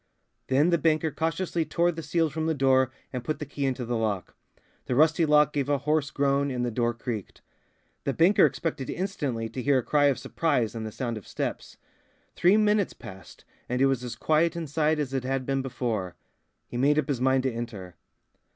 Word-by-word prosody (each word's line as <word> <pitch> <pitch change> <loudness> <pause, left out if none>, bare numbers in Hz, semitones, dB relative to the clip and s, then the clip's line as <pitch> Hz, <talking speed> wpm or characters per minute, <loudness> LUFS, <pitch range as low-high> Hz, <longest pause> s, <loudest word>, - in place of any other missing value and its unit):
Then 145 +6 +3
the 170 - +3
banker 155 0 +2
cautiously 165 +2 -1
tore 170 +3 +1
the 165 -1 -6
seals 165 -1 0
from 160 0 -2
the 160 - +1
door 130 -1 +3 0.2
and 125 -2 -4
put 155 +4 -2
the 150 - -5
key 140 0 -3
into 130 -2 -2
the 120 +1 -2
lock. 105 -4 -2 0.5
The 125 - 0
rusty 155 +3 +4
lock 150 -1 +4
gave 140 -1 -1
a 145 - +3
hoarse 150 +1 0
groan 140 -1 +1
and 125 -2 -2
the 120 - -2
door 120 +1 0
creaked. 115 -4 -6 0.6
The 140 - -1
banker 175 +7 +4
expected 140 -1 -4
instantly 145 - -2
to 125 +3 -5
hear 140 +1 +3
a 125 - 0
cry 145 +3 +2
of 140 -2 +3
surprise 140 -9 0
and 110 -1 -5
the - - -7
sound 120 -2 -4
of 100 - -18
steps. - - -4 0.6
Three 185 +4 +4
minutes 210 -2 +2
passed 95 -5 -12 0.2
and 125 +1 -1
it 135 - +5
was 135 -2 +1
as 125 - -5
quiet 160 +2 +2
inside 155 -1 0
as 140 -3 -3
it 135 -2 -1
had 130 0 -2
been 135 0 0
before. 115 -8 -3 0.5
He 120 - -6
made 145 +4 +3
up 155 - +1
his 135 -4 -2
mind 130 0 +3
to 130 -2 0
enter. 105 -7 -6
135 Hz, 205 wpm, -27 LUFS, 125-155 Hz, 0.6 s, it